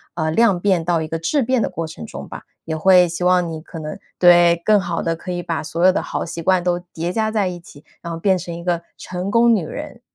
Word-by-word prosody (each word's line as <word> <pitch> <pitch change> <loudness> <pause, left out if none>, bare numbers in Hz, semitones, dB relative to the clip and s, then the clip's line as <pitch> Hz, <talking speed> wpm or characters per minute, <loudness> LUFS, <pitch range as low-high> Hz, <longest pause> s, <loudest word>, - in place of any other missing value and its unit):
呃， 160 -2 -1
量 205 0 +3
变 185 -3 +1
到 170 -1 +1
一 160 - -4
个 165 - -3
质 220 - 0
变 255 -1 +1
的 - - 0
过 165 -1 -4
程 80 - -9
中 - - -8
吧， - - -9 0.2
也 160 - -3
会 180 +2 +5
希 170 +1 -4
望 180 -1 +3
你 160 -1 -6
可 165 0 -9
能 155 -1 -6 0.2
对， 175 -1 +6
更 210 -1 +5
好 175 -2 -3
地 165 0 -1
可 175 +2 -7
以 175 0 -3
把 170 -1 -3
所 165 +2 -3
有 185 - +6
的 - - 0
好 - - -3
习 170 0 -6
惯 185 +1 +2
都 175 0 0 0.2
叠 170 +2 -3
加 220 0 0
在 210 -3 +1
一 180 -1 -4
起， 150 -3 -16 0.2
然 170 - -6
后 165 - -6
变 190 +1 +2
成 170 -1 -6
一 170 - -7
个 175 -1 -1 0.2
成 180 +2 -5
功 235 0 +5
女 185 -6 -2
人。 - - -8
175 Hz, 290 characters per minute, -20 LUFS, 165-185 Hz, 0.2 s, 对